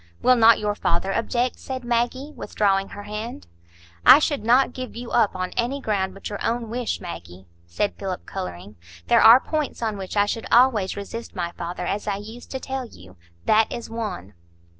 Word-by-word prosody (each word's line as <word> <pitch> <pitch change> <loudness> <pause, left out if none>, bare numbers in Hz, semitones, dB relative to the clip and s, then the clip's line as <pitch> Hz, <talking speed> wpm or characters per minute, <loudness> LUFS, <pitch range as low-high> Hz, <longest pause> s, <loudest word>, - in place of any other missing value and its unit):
"Will 255 - +6
not 230 -1 +6
your 210 -1 -1
father 190 -1 -1
object?" 240 +2 -1
said 260 -1 -6
Maggie, 245 +4 -1
withdrawing 195 -2 0
her 205 - -9
hand. 210 - -6 0.6
"I - - +10
should 290 -3 0
not 250 +3 +4
give 255 -1 -7
you 240 0 -7
up 220 -5 +2
on 185 0 -3
any 250 +4 -1
ground 195 -6 -1
but 195 - -7
your 205 - -5
own 230 -1 -2
wish, 245 0 -2
Maggie," 85 +2 -9 0.2
said 145 - -1
Philip, 190 -2 -4
colouring. 90 +3 -7 0.3
"There - - +6
are 230 +3 +9
points 305 0 -3
on 215 -3 -2
which 190 +2 -6
I 205 - +5
should 225 +2 -4
always 230 -7 +4
resist 230 +3 -7
my 170 -1 -3
father, 175 0 -5
as 205 +1 -3
I 205 - 0
used 220 +4 -10
to 265 - -4
tell 265 -1 -4
you. 90 - -16 0.3
That 220 0 +3
is 235 -1 -6
one." 210 - -5
215 Hz, 190 wpm, -23 LUFS, 190-240 Hz, 0.6 s, I